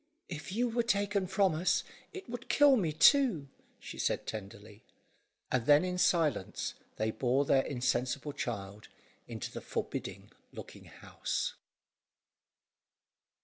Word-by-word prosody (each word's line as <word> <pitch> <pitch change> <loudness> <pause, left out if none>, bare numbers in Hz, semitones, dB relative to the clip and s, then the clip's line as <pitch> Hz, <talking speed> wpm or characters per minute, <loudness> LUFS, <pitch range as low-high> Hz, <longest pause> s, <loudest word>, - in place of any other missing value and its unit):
"If 165 +1 -6
you 240 +5 +1
were 235 +1 0
taken 200 -4 0
from 190 -1 +2
us, 165 +4 +1 0.3
it 385 -1 -9
would 245 +1 -7
kill 285 -2 +6
me 180 -10 0
too," 185 - +4 0.3
she - - -10
said - - 0
tenderly; 105 0 -8 0.7
and 125 -2 0
then 150 +3 +6
in 180 0 -2
silence, 155 - +1 0.2
they 110 +1 -1
bore 130 +4 +1
their 135 -1 +4
insensible 130 +2 -1
child 100 -5 -5 0.4
into - - -6
the - - -7
forbidding - - -5 0.2
looking - - -11
house. - - -4
155 Hz, 125 wpm, -32 LUFS, 125-205 Hz, 0.7 s, kill